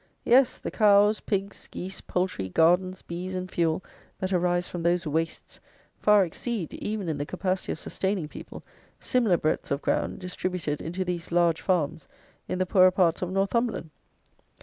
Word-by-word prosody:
Yes, 255 +1 +5
the - - -5
cows, 210 0 +5
pigs, 200 -1 -3
geese, 190 +1 -6
poultry, 180 - -2
gardens, 180 - +2
bees 180 +2 -5
and 185 0 -4
fuel 165 0 0 0.3
that 190 0 -2
arise 175 0 +1
from 175 - -5
those 170 +1 +1
wastes, 160 +2 -3 0.4
far 210 -2 +5
exceed, 190 +1 -4
even 210 -3 -4
in 155 -3 -2
the - - 0
capacity 185 0 -2
of - - -7
sustaining 190 -4 -2
people, - - -10 0.4
similar 230 -8 +2
breadths 155 - -1
of 140 +1 -1
ground, - - 0
distributed 180 -4 -3
into 180 +3 -3
these 175 -1 -4
large 170 -1 +3
farms 160 -5 0 0.4
in - - -2
the 185 - +1
poorer 185 0 +6
parts 180 -3 +2
of 180 - -2
Northumberland. 195 -1 0
180 Hz, 160 wpm, -27 LUFS, 170-195 Hz, 0.4 s, poorer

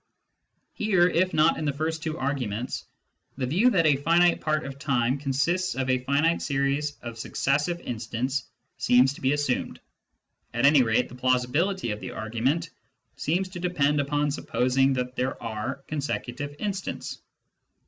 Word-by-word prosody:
Here, 190 -5 +3
if 185 +1 +2
not 155 - +3
in 155 - -2
the 145 - 0
first 160 +2 -2
two 160 0 -3
arguments, 125 -5 -3 0.5
the 130 - -1
view 185 - +3
that 180 -8 +2
a 145 -3 +5
finite 170 +4 +3
part 155 -1 0
of 140 0 -7
time 130 -2 +1
consists 160 +7 0
of 130 0 0
a 130 - +2
finite 145 +6 +1
series 140 +1 0
of 115 -1 -7
successive 150 +9 0
instants 120 +4 -3 0.3
seems 125 +2 +4
to - - -13
be 130 +1 +2
assumed; 145 -3 -1 0.8
at 120 +3 +2
any 145 -1 +7
rate 110 -2 +2
the - - -14
plausibility 130 - +1
of 105 - -4
the - - -6
argument 130 +10 -1 0.4
seems 180 +5 0
to 185 -1 -7
depend 150 -5 +1
upon 145 +1 0
supposing 135 -1 +1
that 125 0 -3
there 130 +1 -2
are 115 +4 -4
consecutive 145 -1 -4
instants. 195 0 -4
140 Hz, 155 wpm, -26 LUFS, 125-160 Hz, 0.8 s, any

